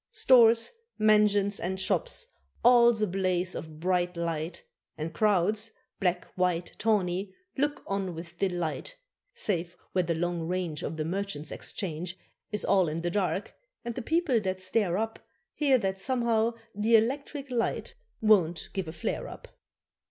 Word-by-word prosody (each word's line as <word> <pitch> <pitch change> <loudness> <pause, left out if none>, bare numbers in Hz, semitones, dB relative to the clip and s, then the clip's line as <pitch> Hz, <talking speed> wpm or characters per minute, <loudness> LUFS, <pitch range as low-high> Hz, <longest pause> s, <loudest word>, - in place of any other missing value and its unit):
Stores, 230 -2 +5 0.3
mansions, 210 -2 +4
and 190 +2 -2
shops 190 - 0 0.4
all's 235 -2 +6
a - - +2
blaze 185 -1 0
of 155 -1 -7
bright 180 0 0
light, 165 0 -3 0.3
And 160 +1 -4
crowds 210 +3 +2 0.3
black, 180 -2 0
white, 180 -2 0
tawney 195 -3 0 0.2
look 290 +1 -1
on 195 -3 -2
with 170 +1 -9
delight 180 - -2 0.4
Save 175 - -2
where 185 - +2
the 170 -1 -1
long 170 0 -2
range 175 -4 -2
Of 160 - -4
the 155 - -2
Merchants' 175 -4 -3
Exchange 175 0 -3 0.3
Is 210 - -1
all 190 -3 +4
in 160 +2 -3
the 175 - 0
dark, 195 +1 -1 0.3
and 235 - -2
the 250 - -4
people 320 -2 +2
that 190 -2 -2
stare 185 -1 +1
up 225 +1 -2 0.3
Hear 280 -3 +3
that 195 -4 -2
somehow 235 -1 +1 0.2
the 215 +3 +3
electric 270 +4 0
light 235 - -1 0.3
won't 180 -7 +3
give 190 -4 -3
a 160 - -6
flare 160 - -3
up. - - -11
190 Hz, 150 wpm, -29 LUFS, 175-225 Hz, 0.4 s, all's